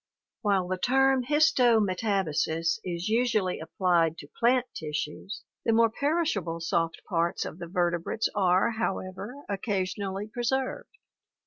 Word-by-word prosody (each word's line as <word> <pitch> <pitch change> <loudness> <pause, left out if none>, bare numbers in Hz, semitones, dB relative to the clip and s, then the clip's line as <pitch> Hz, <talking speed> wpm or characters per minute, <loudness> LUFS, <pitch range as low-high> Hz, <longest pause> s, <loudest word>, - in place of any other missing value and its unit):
While 195 -4 +1
the 185 0 -2
term 270 +3 +3
his 300 +5 +4
tome 230 -4 +4
tab 200 -1 0
asis 165 +5 0
is 175 +1 -3
usually 220 -5 +1
applied 170 -3 +1
to 145 - -10
plant 245 +1 +3
tissues, 155 +5 -5 0.2
the 225 - +2
more 230 0 +4
perishable 280 - -1
soft 165 0 -1
parts 170 -2 0
of 170 - -7
the 170 - -6
vertebrates 175 +3 0
are, 190 +1 +3
however, 195 +2 -3
occasionally 195 0 -2
preserved. 265 - -2
200 Hz, 130 wpm, -28 LUFS, 175-240 Hz, 0.2 s, his